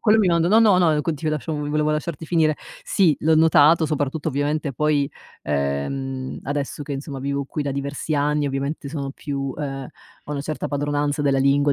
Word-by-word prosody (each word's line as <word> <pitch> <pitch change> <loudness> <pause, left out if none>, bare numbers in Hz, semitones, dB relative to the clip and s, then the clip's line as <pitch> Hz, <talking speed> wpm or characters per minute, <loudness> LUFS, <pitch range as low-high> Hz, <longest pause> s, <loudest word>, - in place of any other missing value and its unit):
Quello 220 0 +4
mi 210 - +4
mando 170 -1 +3
no, 220 +3 +6
no, 215 -4 +6 0.2
ehm - - +3
no - - +1
continua 155 -1 -1
lasciavo 150 +2 -3
v 145 - -3
volevo 150 0 +1
lasciarti 155 +1 -3
finire. 155 -2 +2 0.3
Sì, 195 - +3
l'ho 160 +1 +3
notato 160 0 +5
soprattutto 150 +1 -1
ovviamente 145 0 -1
poi, 145 +1 +1 0.3
ehm, 130 - -2
adesso 145 +1 -3
che, 145 0 -6
insomma, 140 0 -5
vivo 140 +1 -2
qui 150 +2 -4
da 140 - -2
diversi 140 +3 -3
anni 145 0 +1
ovviamente 140 +2 -3
sono 140 -2 -4
più, 135 -2 -4
ehm 135 -3 -4 0.4
ho - - -7
una 145 -1 -2
certa 155 +1 -4
padronanza 145 +1 -1
della 140 -2 +2
lingua, 140 +1 +3
145 Hz, 195 wpm, -22 LUFS, 140-155 Hz, 0.4 s, no